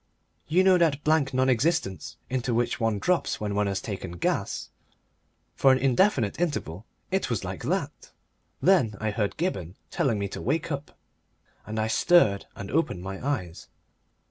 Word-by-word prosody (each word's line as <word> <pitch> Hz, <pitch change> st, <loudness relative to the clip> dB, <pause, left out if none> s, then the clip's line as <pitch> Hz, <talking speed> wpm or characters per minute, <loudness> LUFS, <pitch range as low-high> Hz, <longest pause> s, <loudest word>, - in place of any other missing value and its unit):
You 175 Hz, +6 st, +3 dB
know 190 Hz, -1 st, +5 dB
that 150 Hz, -4 st, +2 dB
blank 155 Hz, -3 st, +2 dB
non 130 Hz, 0 st, +2 dB
existence 115 Hz, -, 0 dB
into 125 Hz, -2 st, -1 dB
which 120 Hz, +2 st, 0 dB
one 115 Hz, -3 st, +1 dB
drops 180 Hz, -, 0 dB
when 105 Hz, -1 st, -2 dB
one 105 Hz, 0 st, +1 dB
has 100 Hz, -1 st, -1 dB
taken 95 Hz, -5 st, -6 dB
"gas." 85 Hz, -, -2 dB, 0.8 s
For 135 Hz, -, +4 dB
an 130 Hz, -, +4 dB
indefinite 130 Hz, -, +2 dB
interval 110 Hz, -, -2 dB, 0.2 s
it 190 Hz, -6 st, 0 dB
was 115 Hz, -5 st, -1 dB
like -, -, -5 dB
that. -, -, -3 dB, 0.5 s
Then 170 Hz, -, +4 dB
I 110 Hz, 0 st, -1 dB
heard 105 Hz, -1 st, -2 dB
Gibberne 95 Hz, -, -2 dB, 0.2 s
telling 135 Hz, -, +1 dB
me 100 Hz, 0 st, -2 dB
to -, -, -6 dB
wake 155 Hz, +6 st, -1 dB
up, 140 Hz, 0 st, -5 dB, 0.7 s
and 110 Hz, +1 st, -5 dB
I 110 Hz, -, +1 dB
stirred 110 Hz, -, +3 dB
and 100 Hz, -1 st, -7 dB
opened 125 Hz, -, 0 dB
my 95 Hz, +2 st, -6 dB
eyes. 90 Hz, -, -3 dB
120 Hz, 165 wpm, -26 LUFS, 100-155 Hz, 0.8 s, know